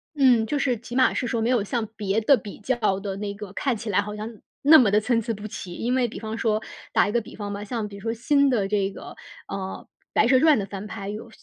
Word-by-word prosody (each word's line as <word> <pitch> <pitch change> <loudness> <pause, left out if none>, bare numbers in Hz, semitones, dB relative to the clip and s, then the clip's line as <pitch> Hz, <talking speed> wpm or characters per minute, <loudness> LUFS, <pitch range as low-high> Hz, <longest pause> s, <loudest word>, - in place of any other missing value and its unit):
嗯， 250 -5 +5
就 290 +5 -1
是 250 -4 +1
起 235 +2 -9
码 260 0 +4
是 - - -1
说 230 -1 -1
没 225 - +1
有 245 -5 +2
像 220 +1 -2
别 205 0 0
的 250 +6 +5
比 210 -4 -9
较 215 -4 0
的 195 -1 -4
那 200 0 -4
个， 200 -1 -9
看 260 0 -1
起 225 +1 -6
来 200 0 +3
好 210 +1 -6
像 215 0 -7 0.2
那 310 +3 +8
么 230 -8 +5
地 210 - +5
参 230 +1 +1
差 230 - -2
不 210 0 -7
齐。 190 -4 -7
因 245 +2 -1
为 255 -2 +2
比 230 - -8
方 220 0 -5
说 215 -1 +1 0.3
打 - - +3
一 - - -1
个 235 - +2
比 - - -12
方 205 -1 -5
吧， 200 - -5
像 215 0 -3
比 200 - -10
如 200 - -10
说 225 +1 -2
新 280 +4 +3
的 215 -7 +1
这 200 -1 0
个， - - -10 0.3
呃， 190 -1 -6 0.3
白 220 - +4
蛇 260 +1 +5
传 305 -5 +5
的 195 - -2
翻 200 0 -7
拍 205 -2 -7
有 215 +3 -7
220 Hz, 295 characters per minute, -25 LUFS, 205-240 Hz, 0.3 s, 那